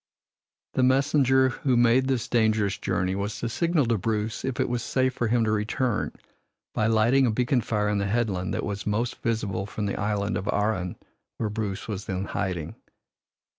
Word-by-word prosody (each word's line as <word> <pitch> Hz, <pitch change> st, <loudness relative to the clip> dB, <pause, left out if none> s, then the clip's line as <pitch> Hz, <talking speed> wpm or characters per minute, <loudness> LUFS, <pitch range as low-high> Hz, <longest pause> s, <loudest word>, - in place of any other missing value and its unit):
The -, -, +1 dB
messenger 130 Hz, 0 st, +4 dB
who 130 Hz, 0 st, 0 dB
made 120 Hz, +2 st, +4 dB
this 130 Hz, -4 st, 0 dB
dangerous 110 Hz, -4 st, +2 dB
journey 90 Hz, 0 st, 0 dB
was 100 Hz, +2 st, -3 dB
to 120 Hz, -, -3 dB
signal 165 Hz, +4 st, +1 dB
to 115 Hz, -2 st, +1 dB
Bruce 110 Hz, +2 st, -2 dB
if 130 Hz, -2 st, -3 dB
it -, -, +2 dB
was 120 Hz, -1 st, -1 dB
safe 130 Hz, +2 st, +1 dB
for 120 Hz, -, -1 dB
him 115 Hz, +1 st, +2 dB
to 110 Hz, -, +1 dB
return 110 Hz, +2 st, 0 dB, 0.6 s
by 110 Hz, -, +1 dB
lighting 115 Hz, +4 st, +4 dB
a -, -, +2 dB
beacon 125 Hz, +2 st, +1 dB
fire 105 Hz, -1 st, 0 dB
on 105 Hz, -1 st, +1 dB
the 100 Hz, -, 0 dB
headland 100 Hz, -4 st, 0 dB
that -, -, -2 dB
was 100 Hz, -1 st, -4 dB
most 115 Hz, +4 st, -1 dB
visible 100 Hz, -4 st, -1 dB
from 105 Hz, 0 st, -4 dB
the 100 Hz, -, -2 dB
Island 105 Hz, 0 st, 0 dB
of 95 Hz, -, -5 dB
Arran 105 Hz, -4 st, 0 dB, 0.4 s
where 110 Hz, -, -1 dB
Bruce 105 Hz, -3 st, -3 dB
was 105 Hz, -3 st, -4 dB
then 95 Hz, 0 st, -3 dB
hiding. 90 Hz, -6 st, -3 dB
110 Hz, 185 wpm, -26 LUFS, 100-120 Hz, 0.6 s, messenger